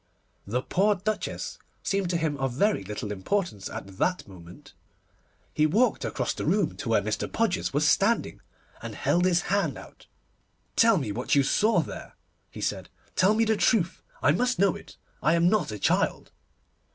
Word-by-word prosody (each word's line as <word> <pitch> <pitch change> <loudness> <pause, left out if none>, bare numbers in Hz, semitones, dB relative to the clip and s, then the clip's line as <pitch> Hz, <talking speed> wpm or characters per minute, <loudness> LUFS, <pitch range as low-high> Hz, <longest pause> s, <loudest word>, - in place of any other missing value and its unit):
The 125 +5 -1
poor 205 +3 +2
Duchess 215 +3 -4 0.2
seemed 195 -2 0
to 175 - +1
him 160 -3 -1
of 135 -2 -2
very 200 - +1
little 105 +1 -5
importance 105 - -2
at 95 -1 -8
that 180 0 0
moment. 90 -3 -14 0.8
He 155 0 +3
walked 220 +8 +2
across 125 -3 -2
the - - -5
room 190 0 +1
to 130 - -5
where 110 -3 +3
Mr. 105 +1 -3
Podgers 225 -5 0
was 145 +2 +2
standing, 210 +7 +1 0.4
and - - -7
held 175 +1 +1
his 175 -2 +3
hand 200 +1 0
out. - - -14 0.7
'Tell 225 -2 +5
me 135 -10 -2
what 120 +7 0
you 140 - +5
saw 215 +11 +3
there,' - - -9 0.3
he - - -9
said. - - -3 0.3
'Tell 195 +3 +4
me 225 +1 +3
the 220 0 +2
truth. 200 -5 +1 0.2
I - - +5
must 250 - +1
know 195 -2 +3
it. - - -12 0.2
I 165 - +3
am 170 +1 +4
not 190 - +1
a 105 - -5
child. - - 0
175 Hz, 175 wpm, -27 LUFS, 125-205 Hz, 0.8 s, Tell